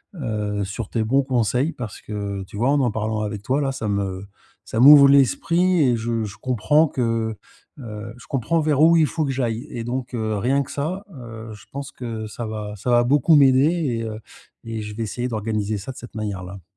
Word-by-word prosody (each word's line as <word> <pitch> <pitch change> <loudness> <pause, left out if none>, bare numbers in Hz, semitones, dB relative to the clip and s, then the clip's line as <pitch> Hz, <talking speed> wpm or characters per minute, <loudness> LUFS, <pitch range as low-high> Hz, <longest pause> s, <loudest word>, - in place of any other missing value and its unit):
heu, 105 - -2
sur 100 - -6
tes 115 - -1
bons 135 +5 +2
conseils. 125 +3 +1
Parce 115 -4 -7
que 100 -2 -5
tu 95 - -13
vois 120 +5 +2
en 145 - +3
en 125 -3 +1
parlant 110 0 -2
avec 105 -1 -4
toi 130 +7 0
là 135 -1 0
ça 125 -5 -4
me 100 -1 -2 0.4
ça 110 - -3
m'ouvre 140 +2 +9
l'esprit 170 +6 +3
et 125 -4 +3
je 115 0 -2
je 105 0 -7
comprends 145 +6 +2
que, 115 -4 -1 0.4
heu, 110 -2 -7
je - - -15
comprends 140 +5 0
vers 150 -2 +1
où 165 +2 +7
il 160 -2 +5
faut 155 +2 -1
que 135 - -1
j'aille 120 0 -2
et 115 - -5
donc 125 +2 -4
heu, 110 -3 -1
rien 135 +7 +1
que - - -11
ça, 170 +7 -3
heu, 115 -4 -9
je 105 - -14
pense 140 -1 -6
que 115 -3 -6
ça 115 +2 -6
va 105 -1 -5
ça 110 - -4
va 120 0 +5
beaucoup 145 +5 +4
m'aider 135 -1 +6 0.3
et - - -3
heu, 110 -1 -5 0.4
et 115 -1 -5
je 105 0 -7
vais 115 - -3
essayer 120 +3 -3
d'organiser 110 -2 -2
ça 100 +7 -6
de 130 - -13
cette 120 - -11
manière 105 -4 -4
là. 95 0 -10
115 Hz, 220 wpm, -22 LUFS, 110-135 Hz, 0.4 s, m'ouvre